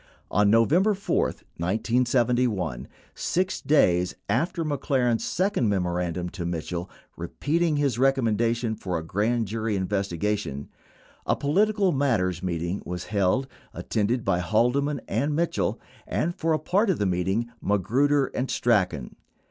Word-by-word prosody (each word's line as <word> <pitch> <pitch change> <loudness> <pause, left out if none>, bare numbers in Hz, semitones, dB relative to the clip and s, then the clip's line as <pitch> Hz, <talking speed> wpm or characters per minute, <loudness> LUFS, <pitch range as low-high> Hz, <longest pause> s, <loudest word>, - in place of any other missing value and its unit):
On 105 +1 +3
November 165 - +4
4, 200 - 0 0.3
1971—6 120 - -1
days 90 - +3
after 165 +5 0
McLaren's 130 -5 0
second 185 - 0
memorandum 90 -2 -1
to 90 0 -6
Mitchell 85 +1 -4 0.3
repeating 155 - -1
his 140 -5 0
recommendation 115 -3 +1
for 90 -5 -3
a 80 - -4
grand 110 +7 0
jury 110 0 -2
investiga 100 0 -1
tion 70 -7 -6 0.3
— - - -30
a - - +3
"political 200 +6 +2
matters 105 - +1
meeting" 85 +1 -2
was 90 0 -5
held, 100 +6 +2 0.3
attended 110 +3 -1
by 90 -2 +2
Haldeman 125 +9 +1
and 145 +1 0
Mitchell 170 +2 0 0.3
and, 170 +2 -1
for 165 +1 -1
a - - +3
part 195 +8 +1
of 185 - +2
the 105 - 0
meeting, 95 +6 0
Magruder 130 +9 +2
and 130 - -2
Strachan. 90 - 0
115 Hz, 130 wpm, -25 LUFS, 90-140 Hz, 0.3 s, November